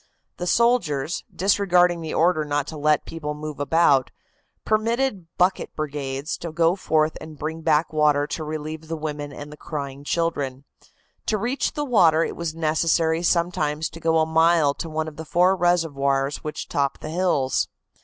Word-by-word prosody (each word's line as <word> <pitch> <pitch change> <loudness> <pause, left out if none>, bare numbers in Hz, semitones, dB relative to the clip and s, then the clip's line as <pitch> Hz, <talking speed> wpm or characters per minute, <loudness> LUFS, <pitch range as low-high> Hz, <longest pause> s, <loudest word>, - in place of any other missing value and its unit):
The 180 - -4
soldiers, 175 - +1
disregarding 180 -3 +2
the 160 -1 -5
order 165 -1 +3
not 145 -1 -1
to 160 - -7
let 150 0 +2
people 150 -2 -5
move 150 -1 -7
about, 145 -3 +3 0.6
permitted 220 -3 0
bucket 180 +2 +1
brigades 145 0 -4
to 170 - -5
go 165 +2 +2
forth 155 -4 +1
and 155 -1 -10
bring 160 +2 -4
back 160 0 +2
water 150 -1 +3
to 155 - -4
relieve 155 +1 -5
the 165 0 -4
women 150 -2 -5
and 145 +1 -9
the 150 - -11
crying 140 -3 -6
children. 145 -5 -2 0.6
To 215 - +1
reach 245 +7 -1
the 295 - -2
water 170 - +4
it - - -4
was 170 -2 -4
necessary 160 +1 +1
sometimes 170 -3 0
to 165 - -10
go 165 0 +2
a 160 - +3
mile 160 -2 +3
to 165 - -6
one 155 0 -2
of 150 -2 -9
the 160 - -5
four 180 +4 +3
reservoirs 145 -6 +1
which 150 - -6
top 140 -1 -1
the 155 - -6
hills. 165 -7 +1
160 Hz, 170 wpm, -23 LUFS, 150-170 Hz, 0.6 s, water